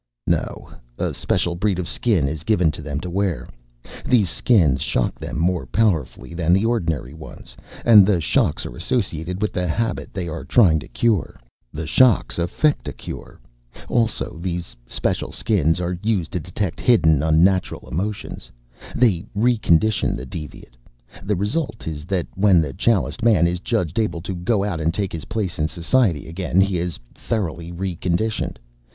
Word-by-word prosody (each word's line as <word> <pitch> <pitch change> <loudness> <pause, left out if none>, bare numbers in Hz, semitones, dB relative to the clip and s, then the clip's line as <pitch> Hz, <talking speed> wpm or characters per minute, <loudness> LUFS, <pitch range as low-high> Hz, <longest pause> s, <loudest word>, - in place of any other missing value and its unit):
"No. - - -1 0.3
A - - -1
special 85 - 0
breed 95 +2 0
of 90 -2 -3
Skin 100 - +1
is 80 +2 -4
given 90 -7 +2
them 75 -1 -5
to 90 - -5
wear. 95 -2 -1 0.6
These 105 -9 +3
Skins 80 - +3
shock 60 - -1
them - - -5
more 85 +2 0
powerfully 90 - 0
than 85 0 +1
the 100 +4 +3
ordinary 85 - -1
ones, 80 0 -11 0.3
and 110 -4 +9
the 95 -2 +2
shocks 75 - +1
are - - -7
associated 90 - -2
with 105 - -1
the 90 0 -1
habit 115 +7 -2
they 95 -4 -4
are 80 0 -5
trying 90 -11 +4
to - - -10
cure. 105 - 0 0.3
The 80 +2 -5
shocks 115 - +3
effect 145 - +1
a - - -3
cure. - - -9 0.5
Also, 115 -8 0
these 85 -1 -4
special - - -2
Skins 80 -6 +1
are 90 0 -2
used 105 -7 0
to 90 - -2
detect 90 +1 -4
hidden 80 - +4
unnatural 85 +4 +2
emotions. 95 - -4 0.5
They 110 -9 +3
re 120 +4 +3
condition 95 +2 +2
the 65 - -6
deviate. 65 -3 -9 0.4
The 105 +1 -1
result 110 - -2
is 75 -2 -5
that 90 -2 -1
when 95 -2 +4
the 75 -4 -1
Chaliced 115 - +1
Man 110 -7 +4
is 85 +1 0
judged 95 -3 -1
able 105 -7 -1
to 90 +2 -5
go 95 +4 0
out 95 -6 -2
and 80 +1 +1
take 100 -2 -2
his 80 -2 -5
place 100 -6 -3
in 75 - +2
society 85 - +1
again, 85 +2 -1
he 95 -2 +2
is 85 -1 -3 0.2
thoroughly 85 -6 -3
re 90 +1 -3
conditioned. 90 +6 -1
90 Hz, 170 wpm, -22 LUFS, 80-105 Hz, 0.6 s, and